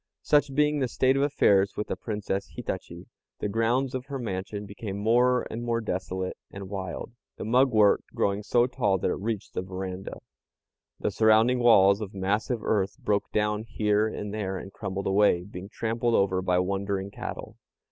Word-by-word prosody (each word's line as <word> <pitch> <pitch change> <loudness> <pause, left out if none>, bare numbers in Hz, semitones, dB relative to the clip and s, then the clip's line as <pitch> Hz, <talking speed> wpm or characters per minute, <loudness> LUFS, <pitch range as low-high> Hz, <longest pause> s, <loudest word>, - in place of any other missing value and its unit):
Such 145 -2 +2
being 150 0 +3
the 130 - +1
state 130 +2 +2
of 135 - +1
affairs 100 -9 +3
with 105 - -1
the - - -3
Princess 105 -3 -3
Hitachi, 95 -6 -6 0.3
the - - -2
grounds 115 +5 +1
of 130 +1 -4
her 140 -1 -4
mansion 100 -3 -4
became 100 0 -6
more 125 +4 +3
and 115 - -4
more 115 -1 0
desolate 95 -3 -3
and 100 0 -9
wild, 95 +3 -5 0.3
the - - -5
mugwort 115 -3 +4
growing 100 +1 +1
so 120 +3 +3
tall 105 -6 +1
that 90 - 0
it - - -3
reached 110 0 -4
the - - -2
veranda. 95 0 -6 0.8
The - - -1
surrounding 110 +3 +4
walls 100 -4 +6
of 100 -1 -6
massive 105 +5 -1
earth 100 0 0
broke 105 -6 -1
down 105 0 0
here 110 -1 +1
and 105 -1 -5
there 95 -3 -3
and 95 +1 -9
crumbled 95 -1 -4
away, 95 -3 +3
being 95 0 -9
trampled 115 +1 -1
over 95 -1 +2
by 90 -1 +1
wandering 100 +1 -1
cattle. - - -7
105 Hz, 175 wpm, -27 LUFS, 95-115 Hz, 0.8 s, walls